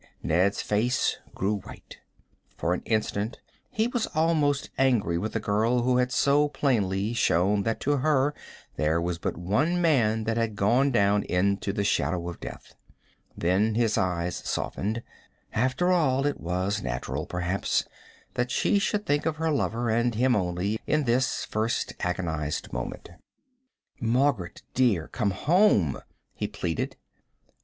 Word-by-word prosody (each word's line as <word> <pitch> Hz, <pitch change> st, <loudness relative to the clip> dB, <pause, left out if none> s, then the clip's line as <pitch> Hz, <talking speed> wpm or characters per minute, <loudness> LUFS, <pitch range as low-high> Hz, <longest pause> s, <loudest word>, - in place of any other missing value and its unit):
Ned's 90 Hz, +5 st, +1 dB
face 115 Hz, +5 st, +1 dB, 0.2 s
grew 100 Hz, +2 st, 0 dB
white. -, -, -12 dB, 0.6 s
For 85 Hz, -, 0 dB
an -, -, -2 dB
instant 110 Hz, 0 st, -1 dB, 0.3 s
he 220 Hz, +1 st, 0 dB
was 245 Hz, -2 st, -1 dB
almost 155 Hz, -3 st, +1 dB
angry 115 Hz, -11 st, +2 dB
with 110 Hz, +4 st, -3 dB
the 115 Hz, -, 0 dB
girl 110 Hz, +4 st, +1 dB
who 125 Hz, 0 st, +2 dB
had 125 Hz, 0 st, +1 dB
so 145 Hz, +2 st, +3 dB
plainly 110 Hz, -7 st, 0 dB
shown 100 Hz, -2 st, +2 dB
that 115 Hz, +2 st, -1 dB
to 145 Hz, +1 st, +1 dB
her 145 Hz, 0 st, +2 dB, 0.4 s
there 80 Hz, +2 st, +2 dB
was 85 Hz, 0 st, -2 dB
but -, -, -3 dB
one 130 Hz, -, +1 dB
man 120 Hz, -10 st, +2 dB
that 115 Hz, +1 st, -1 dB
had 115 Hz, -2 st, 0 dB
gone 120 Hz, +8 st, +3 dB
down 100 Hz, -4 st, +3 dB
into 100 Hz, +2 st, 0 dB
the 100 Hz, 0 st, -1 dB
shadow 90 Hz, -3 st, 0 dB
of 85 Hz, -, -8 dB
death. -, -, -9 dB, 0.6 s
Then 100 Hz, +6 st, +2 dB
his 115 Hz, -2 st, +2 dB
eyes 90 Hz, -1 st, -1 dB
softened. 110 Hz, +4 st, -3 dB, 0.5 s
After 130 Hz, +10 st, +1 dB
all, 140 Hz, -6 st, +2 dB
it 145 Hz, -, -1 dB
was 95 Hz, +4 st, -1 dB
natural, 65 Hz, +3 st, -3 dB
perhaps, 90 Hz, +2 st, -1 dB, 0.5 s
that 125 Hz, 0 st, -1 dB
she 200 Hz, -, +2 dB
should 210 Hz, +1 st, -1 dB
think 145 Hz, +2 st, +1 dB
of 160 Hz, -, 0 dB
her 160 Hz, 0 st, 0 dB
lover, 120 Hz, -5 st, 0 dB
and 120 Hz, +1 st, +1 dB
of -, -, -3 dB
him 125 Hz, 0 st, +4 dB
only, 95 Hz, +3 st, -1 dB
in 155 Hz, -1 st, +2 dB
this 130 Hz, +1 st, +1 dB
first 110 Hz, +2 st, -1 dB
agonized 80 Hz, -4 st, -2 dB
moment. 60 Hz, +7 st, -5 dB, 0.9 s
"Margaret, 120 Hz, -5 st, 0 dB
dear, 110 Hz, -11 st, +2 dB
come 105 Hz, -, 0 dB
home," 110 Hz, -, +3 dB, 0.3 s
he -, -, -3 dB
pleaded. 80 Hz, -3 st, -3 dB
110 Hz, 150 wpm, -27 LUFS, 95-135 Hz, 0.9 s, him